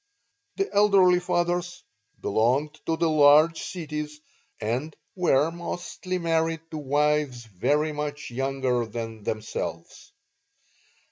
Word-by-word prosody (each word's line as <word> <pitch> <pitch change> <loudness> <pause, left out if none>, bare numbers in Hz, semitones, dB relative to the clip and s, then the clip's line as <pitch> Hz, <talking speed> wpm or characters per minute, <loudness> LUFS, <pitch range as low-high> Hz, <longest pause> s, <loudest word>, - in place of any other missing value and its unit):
The 395 0 0
elderly 195 -3 +5
fathers 175 0 -1 0.4
belonged 130 +9 +1
to 160 - +1
the 165 - +2
large 155 +1 +5
cities, 150 -3 -5 0.4
and 125 +8 -2 0.2
were 165 -4 +3
mostly 175 +2 -5
married 165 -2 0
to 155 - -4
wives 145 -3 0
very 145 - 0
much 145 -2 -5
younger 130 -2 -1
than 115 0 -6
themselves. 110 +1 -5
150 Hz, 105 wpm, -26 LUFS, 130-170 Hz, 0.4 s, elderly